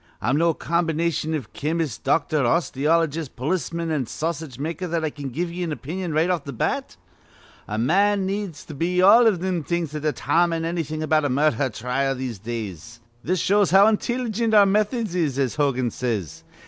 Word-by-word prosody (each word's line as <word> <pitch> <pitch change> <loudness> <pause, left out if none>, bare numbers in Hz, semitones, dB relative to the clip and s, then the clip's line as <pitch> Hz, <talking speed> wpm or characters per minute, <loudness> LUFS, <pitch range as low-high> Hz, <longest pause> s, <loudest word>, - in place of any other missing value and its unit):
I'm 130 +4 0
no 165 +1 +2
combi 170 -1 0
nation 160 -1 -1
iv 120 - -6
chemist, 155 -5 -2
doctor, 150 +2 +1
osteologist, 155 +2 +1
polisman, 165 +4 -2
an' 140 -6 -1
sausage 160 -4 -4
maker, 165 +6 -4
that 165 -1 -1
I 155 - -2
can 145 -2 -6
give 170 +7 -3
ye 175 +1 -5
an 170 -2 -2
opinion 165 +5 -4
right 155 +3 +2
off 170 -5 -1
th' 140 -4 -8
bat. - - -2 0.7
A 105 - -3
man 195 - +2
needs 195 -4 -4
to 155 - -9
be 175 +5 -1
all 225 +6 +7
iv 200 -6 +2
thim 180 -3 -1
things 170 -1 -2
to 150 0 -5
detarmine 165 +3 +1
annything 160 -2 -3
about 155 0 +2
a - - +1
murdher 140 -1 +2
trile 125 +4 -1
in - - -8
these 125 -5 -5
days. 115 -1 -6 0.2
This 185 +2 0
shows 200 +1 +3
how 195 +3 +7
intilligent 225 0 0
our 205 -1 +8
methods 210 +1 0
is, 155 -7 0
as 135 -1 -1
Hogan 130 -5 +1
says. 110 - -3
160 Hz, 185 wpm, -23 LUFS, 135-180 Hz, 0.7 s, our